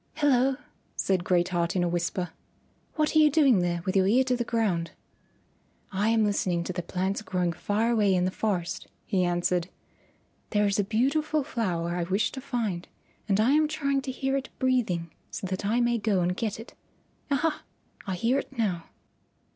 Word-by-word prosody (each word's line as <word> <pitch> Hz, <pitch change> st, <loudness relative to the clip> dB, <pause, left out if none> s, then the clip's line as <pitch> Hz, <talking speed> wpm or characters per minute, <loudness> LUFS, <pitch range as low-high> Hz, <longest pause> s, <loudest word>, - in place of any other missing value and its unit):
"Hello," 270 Hz, -3 st, +3 dB, 0.4 s
said 185 Hz, -2 st, +1 dB
Great 175 Hz, -1 st, +2 dB
Heart 170 Hz, -1 st, 0 dB
in 180 Hz, -, +2 dB
a -, -, +1 dB
whisper, 175 Hz, 0 st, -2 dB, 0.6 s
"what 305 Hz, 0 st, +1 dB
are -, -, +7 dB
you 305 Hz, -1 st, +7 dB
doing 275 Hz, -, +4 dB
there 175 Hz, -1 st, -1 dB
with 185 Hz, -, -1 dB
your 190 Hz, -1 st, +4 dB
ear 245 Hz, +6 st, +4 dB
to 255 Hz, -1 st, +1 dB
the 240 Hz, -, -1 dB
ground?" 210 Hz, -8 st, 0 dB, 1.0 s
"I 205 Hz, +3 st, +1 dB
am 225 Hz, -1 st, +3 dB
listening 185 Hz, -4 st, 0 dB
to 185 Hz, -, -4 dB
the 175 Hz, -, -2 dB
plants 190 Hz, +4 st, -2 dB
growing 180 Hz, -4 st, -1 dB
far 215 Hz, +7 st, 0 dB
away 205 Hz, -5 st, +3 dB
in 180 Hz, 0 st, +2 dB
the 185 Hz, -, 0 dB
forest," 185 Hz, -5 st, -2 dB, 0.2 s
he 185 Hz, -2 st, +1 dB
answered. 175 Hz, 0 st, 0 dB, 0.8 s
"There 210 Hz, -1 st, +2 dB
is 200 Hz, 0 st, +1 dB
a -, -, +3 dB
beautiful 280 Hz, +8 st, +1 dB
flower 175 Hz, -, -2 dB
I -, -, 0 dB
wish 195 Hz, +4 st, +1 dB
to 265 Hz, -, -7 dB
find, 230 Hz, -10 st, -2 dB, 0.4 s
and 195 Hz, 0 st, +3 dB
I 225 Hz, +5 st, +4 dB
am 305 Hz, +1 st, +4 dB
trying 280 Hz, -3 st, 0 dB
to 265 Hz, -1 st, -4 dB
hear 270 Hz, +1 st, -1 dB
it 270 Hz, -1 st, -3 dB
breathing 215 Hz, -11 st, 0 dB, 0.2 s
so -, -, -5 dB
that 190 Hz, +2 st, -3 dB
I 230 Hz, +3 st, +2 dB
may 240 Hz, -1 st, +2 dB
go 205 Hz, -3 st, +1 dB
and 180 Hz, +1 st, 0 dB
get 215 Hz, 0 st, -3 dB
it. 225 Hz, -, -10 dB, 0.6 s
Aha! 300 Hz, +3 st, 0 dB, 0.5 s
I 190 Hz, -, -1 dB
hear 235 Hz, +9 st, +1 dB
it 270 Hz, -, -9 dB
now." 180 Hz, -7 st, -1 dB
205 Hz, 190 wpm, -27 LUFS, 180-255 Hz, 1.0 s, are